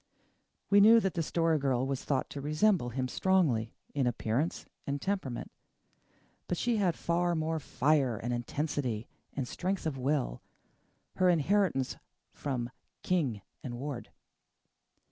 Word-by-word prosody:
We 200 Hz, 0 st, +7 dB
knew 225 Hz, +3 st, +8 dB
that 195 Hz, -4 st, 0 dB
the 170 Hz, -, 0 dB
Story 165 Hz, 0 st, +1 dB
Girl 130 Hz, -2 st, +1 dB
was 135 Hz, -1 st, -2 dB
thought 135 Hz, -3 st, 0 dB
to 140 Hz, -, -5 dB
resemble 155 Hz, -, +2 dB
him 130 Hz, +2 st, -2 dB
strongly 130 Hz, -9 st, +2 dB, 0.2 s
in 135 Hz, -3 st, +1 dB
appearance 120 Hz, +6 st, -1 dB, 0.2 s
and 140 Hz, 0 st, -1 dB
temperament, 190 Hz, -9 st, -3 dB, 1.0 s
but 175 Hz, -, -1 dB
she 240 Hz, +3 st, +1 dB
had 185 Hz, -5 st, +2 dB
far 175 Hz, +1 st, +1 dB
more 160 Hz, 0 st, 0 dB
fire 140 Hz, -4 st, +2 dB
and 120 Hz, +4 st, -3 dB
intensity 120 Hz, -2 st, -2 dB, 0.3 s
and 135 Hz, -3 st, -3 dB
strength 185 Hz, +5 st, -2 dB
of 145 Hz, -4 st, -2 dB
will 135 Hz, -, 0 dB, 0.8 s
her 185 Hz, -1 st, +4 dB
inheritance 175 Hz, -4 st, +2 dB, 0.4 s
from 125 Hz, -4 st, -3 dB, 0.3 s
King 140 Hz, -, 0 dB, 0.2 s
and 120 Hz, -2 st, -4 dB
Ward. 135 Hz, 0 st, -5 dB
145 Hz, 135 wpm, -31 LUFS, 125-175 Hz, 1.0 s, knew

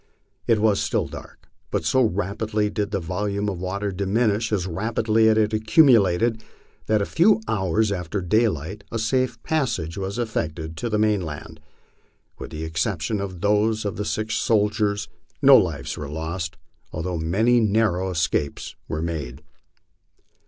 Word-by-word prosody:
It 115 Hz, -, +4 dB
was 105 Hz, -1 st, +2 dB
still -, -, 0 dB
dark, -, -, -11 dB, 0.2 s
but -, -, -2 dB
so 130 Hz, -, +3 dB
rapidly 105 Hz, 0 st, -1 dB
did 105 Hz, -1 st, -2 dB
the 100 Hz, -1 st, -1 dB
volume 100 Hz, +4 st, -2 dB
of 95 Hz, -4 st, -3 dB
water 100 Hz, +2 st, -3 dB
diminish 105 Hz, +3 st, 0 dB
as 95 Hz, -4 st, 0 dB
rapidly 110 Hz, +4 st, +1 dB
as 110 Hz, -, +3 dB
it -, -, +5 dB
had 110 Hz, +1 st, 0 dB
accumulated 110 Hz, -, +4 dB, 0.4 s
that 110 Hz, -1 st, +2 dB
a -, -, -1 dB
few 200 Hz, -, +4 dB
hours 105 Hz, +1 st, +1 dB
after 90 Hz, 0 st, -3 dB
daylight 100 Hz, -1 st, 0 dB
a 115 Hz, -, -2 dB
safe 125 Hz, +1 st, 0 dB
passage 110 Hz, -, -1 dB
was 95 Hz, +2 st, -4 dB
effected 80 Hz, -9 st, -3 dB
to 120 Hz, -, -3 dB
the 105 Hz, -, 0 dB
mainland. 100 Hz, -9 st, -1 dB, 0.8 s
With -, -, -7 dB
the 80 Hz, +1 st, -6 dB
exception 85 Hz, +4 st, -2 dB
of 95 Hz, -3 st, -6 dB
those 105 Hz, +2 st, +2 dB
of 100 Hz, -, -2 dB
the 105 Hz, -, -3 dB
six 110 Hz, +1 st, -2 dB
soldiers, 105 Hz, -1 st, +1 dB, 0.3 s
no 140 Hz, -1 st, +8 dB
lives 85 Hz, -, +1 dB
were 70 Hz, -2 st, -6 dB
lost, 80 Hz, +2 st, -4 dB, 0.3 s
although 85 Hz, +1 st, -3 dB
many 110 Hz, +10 st, +2 dB
narrow 105 Hz, -4 st, +1 dB
escapes 80 Hz, -4 st, -2 dB
were 80 Hz, 0 st, -3 dB
made. 75 Hz, -5 st, -5 dB
105 Hz, 150 wpm, -23 LUFS, 90-110 Hz, 0.8 s, no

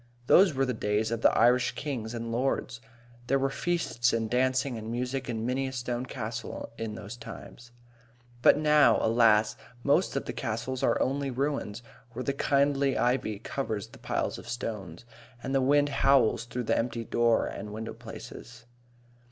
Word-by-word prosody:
Those 180 Hz, +2 st, +6 dB
were 135 Hz, +1 st, +2 dB
the 130 Hz, -, -1 dB
days 110 Hz, 0 st, -1 dB
of 115 Hz, -1 st, -2 dB
the -, -, +6 dB
Irish 125 Hz, +2 st, +4 dB
kings 120 Hz, -6 st, -4 dB
and 115 Hz, 0 st, -4 dB
lords. 125 Hz, -1 st, -1 dB, 0.5 s
There 135 Hz, -, +3 dB
were 135 Hz, 0 st, 0 dB
feasts 135 Hz, -8 st, 0 dB
and 115 Hz, -1 st, -1 dB
dancing 130 Hz, +1 st, +1 dB
and 110 Hz, 0 st, -6 dB
music 125 Hz, +1 st, -3 dB
in 110 Hz, -1 st, -2 dB
many 130 Hz, +2 st, -1 dB
a -, -, -5 dB
stone 125 Hz, 0 st, -3 dB
castle 115 Hz, -1 st, -6 dB
in 110 Hz, -2 st, -5 dB
those 110 Hz, 0 st, -8 dB
times. 120 Hz, 0 st, -11 dB, 0.7 s
But -, -, +6 dB
now, 150 Hz, -6 st, +5 dB
alas, 110 Hz, -2 st, +4 dB, 0.3 s
most 145 Hz, +5 st, +2 dB
of 135 Hz, -, -2 dB
the -, -, -4 dB
castles 125 Hz, +2 st, -3 dB
are -, -, +2 dB
only 140 Hz, +1 st, 0 dB
ruins, 130 Hz, -4 st, -2 dB, 0.3 s
where 130 Hz, -, -4 dB
the 140 Hz, -, -1 dB
kindly 140 Hz, -1 st, +2 dB
ivy 120 Hz, -4 st, 0 dB
covers 110 Hz, -2 st, -4 dB
the -, -, -15 dB
piles -, -, -2 dB
of 120 Hz, -, -11 dB
stones, 105 Hz, -6 st, -5 dB, 0.4 s
and 135 Hz, -, -3 dB
the 135 Hz, -, +3 dB
wind 145 Hz, +2 st, +3 dB
howls 135 Hz, -5 st, +3 dB
through 120 Hz, +1 st, -4 dB
the -, -, +1 dB
empty 115 Hz, 0 st, -2 dB
door 115 Hz, 0 st, +2 dB
and 105 Hz, +1 st, -6 dB
window 110 Hz, +1 st, -5 dB
places. 115 Hz, +1 st, -11 dB
120 Hz, 170 wpm, -28 LUFS, 115-135 Hz, 0.7 s, Those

